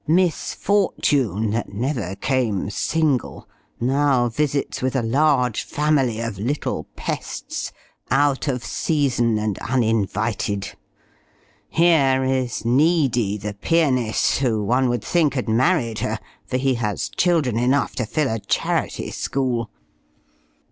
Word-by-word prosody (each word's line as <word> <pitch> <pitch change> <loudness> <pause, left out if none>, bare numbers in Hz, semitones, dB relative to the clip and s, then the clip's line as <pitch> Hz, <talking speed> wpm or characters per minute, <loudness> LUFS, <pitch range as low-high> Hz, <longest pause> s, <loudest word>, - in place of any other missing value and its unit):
Miss 170 0 +1
Fortune, 135 - +1
that 115 +2 -2
never 120 -5 -2
came 110 -6 -1
single, 150 -1 -1 0.3
now 130 -1 +2
visits 140 +3 -1
with 130 +1 -1
a 130 - +1
large 125 -1 +2
family 145 -6 0
of 115 -5 -4
little 135 +8 -2
pests - - -4 0.4
out 140 +1 +2
of 125 -4 -2
season 125 -7 +1
and 105 -2 -2
uninvited! 110 -4 -1 1.0
Here 140 -6 +3
is 130 -3 -1
Needy, 125 - +2
the 105 0 -5
pianist, 130 -2 +1
who, 115 -6 +1
one 125 +4 +2
would 120 -3 -1
think, 155 -5 +1
had 125 - -2
married 120 0 +1
her; - - -1 0.3
for 125 - -1
he 135 0 +1
has 105 -2 -1
children 155 -10 +1
enough 130 +4 +1
to 125 -5 -1
fill 150 +4 0
a 115 - -2
charity - - -1
school. 125 -5 -1
130 Hz, 120 wpm, -22 LUFS, 115-145 Hz, 1.0 s, Here